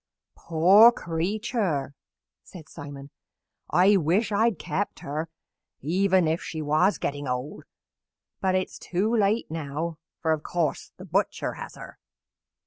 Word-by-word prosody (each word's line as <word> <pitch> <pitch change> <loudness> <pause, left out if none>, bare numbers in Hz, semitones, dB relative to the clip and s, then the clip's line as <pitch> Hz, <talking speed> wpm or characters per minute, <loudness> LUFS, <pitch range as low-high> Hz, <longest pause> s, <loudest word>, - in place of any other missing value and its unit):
"Poor 190 +8 +6
creature!" 175 - -2 0.5
said 165 -5 -12
Simon. 145 -2 -10 0.6
"I 195 +3 +5
wish 185 +7 +1
I 210 +2 +3
had 230 -6 +1
kept 175 +6 -3
her 155 +3 -4 0.5
even 185 +3 +2
if 160 +2 0
she 160 - -6
was 155 +6 +2
getting 145 0 -3
old; 125 +3 -4 0.7
but 190 -1 +1
it 185 0 +1
is - - -13
too 205 +6 -1
late 210 -3 +1
now, 160 +1 -4 0.2
for, 160 - 0
of 155 -1 0
course, 165 -1 -2
the - - -10
butcher - - -1
has - - -9
her." - - -11
170 Hz, 135 wpm, -26 LUFS, 150-200 Hz, 0.7 s, Poor